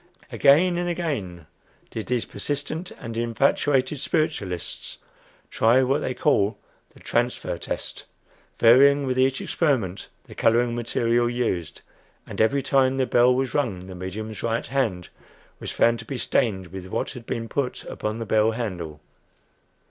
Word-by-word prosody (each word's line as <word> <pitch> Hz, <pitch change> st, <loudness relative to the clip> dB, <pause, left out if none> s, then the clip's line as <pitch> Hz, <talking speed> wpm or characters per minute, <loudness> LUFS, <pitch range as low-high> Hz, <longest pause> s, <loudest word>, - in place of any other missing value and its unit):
Again 175 Hz, +5 st, +4 dB
and 175 Hz, 0 st, -1 dB
again 110 Hz, -, -3 dB, 0.5 s
did 110 Hz, -, -5 dB
these 125 Hz, -2 st, 0 dB
persistent 150 Hz, +5 st, -3 dB
and 115 Hz, -1 st, -7 dB
infatuated 130 Hz, +4 st, +1 dB
spiritualists 135 Hz, -, -2 dB, 0.5 s
try 120 Hz, +4 st, +4 dB
what 135 Hz, +3 st, +1 dB
they 125 Hz, -, -2 dB
call 105 Hz, -8 st, +2 dB, 0.4 s
the -, -, -16 dB
"transfer -, -, -1 dB
test," -, -, -5 dB, 0.5 s
varying 140 Hz, +4 st, +6 dB
with 130 Hz, -1 st, -1 dB
each 130 Hz, +1 st, +2 dB
experiment 120 Hz, -, -1 dB, 0.2 s
the -, -, -13 dB
coloring 120 Hz, +1 st, +2 dB
material 120 Hz, 0 st, +1 dB
used, 115 Hz, -10 st, -2 dB, 0.4 s
and -, -, -3 dB
every 135 Hz, +5 st, +2 dB
time 135 Hz, -1 st, +2 dB
the 130 Hz, -, +2 dB
bell 125 Hz, +1 st, +4 dB
was 130 Hz, 0 st, -1 dB
rung 105 Hz, -11 st, -1 dB
the 95 Hz, -, -9 dB
medium's 100 Hz, +4 st, -6 dB
right 115 Hz, 0 st, -1 dB
hand 115 Hz, -10 st, -1 dB, 0.5 s
was -, -, -6 dB
found 115 Hz, 0 st, +3 dB
out -, -, -13 dB
to -, -, -9 dB
be 135 Hz, -, -5 dB
stained 100 Hz, -5 st, 0 dB
with 95 Hz, -1 st, -7 dB
what -, -, -2 dB
had 115 Hz, -2 st, -10 dB
been 115 Hz, 0 st, -3 dB
put 125 Hz, +2 st, -3 dB
upon 105 Hz, +1 st, -4 dB
the 115 Hz, -, -4 dB
bell 110 Hz, +1 st, +2 dB
handle. 90 Hz, -10 st, -5 dB
120 Hz, 150 wpm, -24 LUFS, 110-135 Hz, 0.5 s, varying